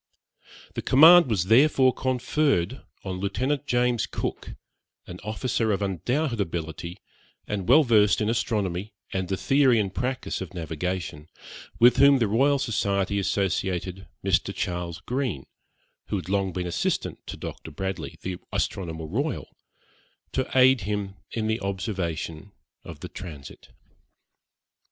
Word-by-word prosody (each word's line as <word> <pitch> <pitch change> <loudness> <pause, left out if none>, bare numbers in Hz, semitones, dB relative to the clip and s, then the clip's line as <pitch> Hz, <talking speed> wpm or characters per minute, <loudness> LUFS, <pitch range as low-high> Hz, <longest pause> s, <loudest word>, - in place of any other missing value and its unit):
The - - -3
command 160 +3 +8
was 100 -6 +1
therefore 130 +5 +5
conferred 130 - 0 0.2
on 95 -2 -4
Lieutenant 130 +9 -1
James 125 -1 +1
Cook, - - -5 0.5
an 90 0 -9
officer 110 +1 -1
of 100 0 0
undoubted 120 - -1
ability, 85 0 -4 0.5
and 100 -2 -3
well 150 +5 +7
versed 105 -5 +4
in 105 - 0
astronomy 105 -4 -1 0.2
and 95 -1 -1
the 95 - -1
theory 135 -2 +4
and 100 -3 -1
practice 125 -2 -3
of 95 -1 -7
navigation, 80 -1 -4 0.5
with 120 +2 +6
whom 140 +1 +7
the 115 -4 +2
Royal 135 +7 +3
Society 100 -6 0
associated 95 -1 -1 0.2
Mr. 95 +1 +2
Charles 90 -3 -3
Green, 125 - -2 0.6
who - - -2
had 95 -2 -4
long 100 -1 +1
been 90 0 -3
assistant 85 - -1
to - - -6
Dr. - - -7
Bradley, 95 -1 -5
the 90 -1 -3
astronomer 80 -4 -2
royal, 135 - -3 0.8
to - - -1
aid 130 -1 +6
him 100 0 -3 0.2
in 110 -2 -3
the 110 +1 0
observation 95 -2 -4 0.3
of - - -10
the - - -5
transit. 80 -7 -10
100 Hz, 130 wpm, -26 LUFS, 90-125 Hz, 0.8 s, command